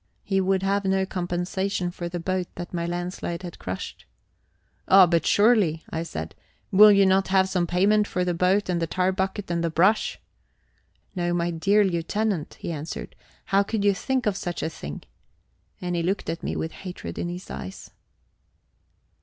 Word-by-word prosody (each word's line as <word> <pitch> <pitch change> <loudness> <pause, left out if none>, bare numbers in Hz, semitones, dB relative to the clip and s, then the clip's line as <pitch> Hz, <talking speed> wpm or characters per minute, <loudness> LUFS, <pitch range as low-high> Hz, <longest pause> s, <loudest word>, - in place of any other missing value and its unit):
He 195 -1 +1
would 190 0 +1
have 200 +1 +1
no 190 0 +1
compensation 180 +1 -2
for 175 -1 -5
the 175 0 -4
boat 185 +1 -1
that 175 +1 -7
my 170 -1 -2
landslide 175 0 -4
had 175 -2 -8
crushed. 90 0 -6 0.8
"Oh, 190 -1 +8
but 170 -1 +1
surely," 205 -7 +3
I 160 - -2
said, 80 - -5 0.4
"will 210 +2 +9
you 200 -1 +5
not 190 0 +3
have 190 0 +3
some 180 -2 0
payment 205 +4 +3
for 180 0 -1
the 175 - 0
boat 185 +4 +2
and 175 -2 0
the 165 - 0
tar 185 +3 +1
bucket 190 0 -3
and 170 0 0
the 170 - +1
brush?" 185 +7 +2 1.0
"No, 175 -1 0
my 175 0 0
dear 195 +6 +3
Lieutenant," 190 0 -1
he - - -5
answered. 155 0 -6 0.3
"How 195 +1 +3
could 200 0 -1
you 200 - +5
think 260 +5 -1
of 210 -3 +1
such 175 -2 -4
a - - 0
thing?" 75 - -8 0.8
And 180 -1 -3
he 170 - 0
looked 185 +4 -1
at 165 - -6
me - - -3
with 160 - -3
hatred 180 - -7
in 175 - -2
his 180 +1 -7
eyes. 95 - -8
180 Hz, 180 wpm, -25 LUFS, 170-195 Hz, 1.0 s, will